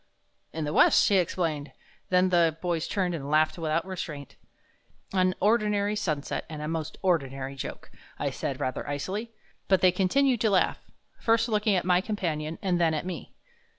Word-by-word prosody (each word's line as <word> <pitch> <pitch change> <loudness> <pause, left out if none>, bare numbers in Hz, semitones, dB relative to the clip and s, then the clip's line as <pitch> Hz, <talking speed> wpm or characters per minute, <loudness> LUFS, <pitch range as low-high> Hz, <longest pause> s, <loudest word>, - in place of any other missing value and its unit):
"In 160 - -4
the 150 - -3
west," - - +5
he 200 - +4
explained. 165 -4 -1 0.4
Then 185 0 +4
the 170 -3 +3
boys 170 -2 -1
turned 185 -3 -1
and 145 -4 -5
laughed 155 +2 +2
without 160 +1 0
restraint. 160 -7 -6 0.8
"An 185 -1 +2
ordinary 210 -1 +2
sunset 155 -9 -2
and 155 -2 -6
a 150 - -4
most 160 -1 -4
ordinary 135 -7 0
joke," 135 - -7 0.3
I - - -1
said, - - -4
rather 130 +2 -3
icily. 195 +11 -3 0.4
But 190 -3 +3
they 185 - +6
continued 235 +7 +2
to 220 - +3
laugh, 195 -2 +2 0.4
first 230 +1 +2
looking 210 -2 +2
at 180 - 0
my 180 0 +4
companion 165 -7 -3
and 180 -2 +1
then 160 -2 +3
at 155 - -3
me. 185 -1 -7
180 Hz, 170 wpm, -27 LUFS, 155-195 Hz, 0.8 s, they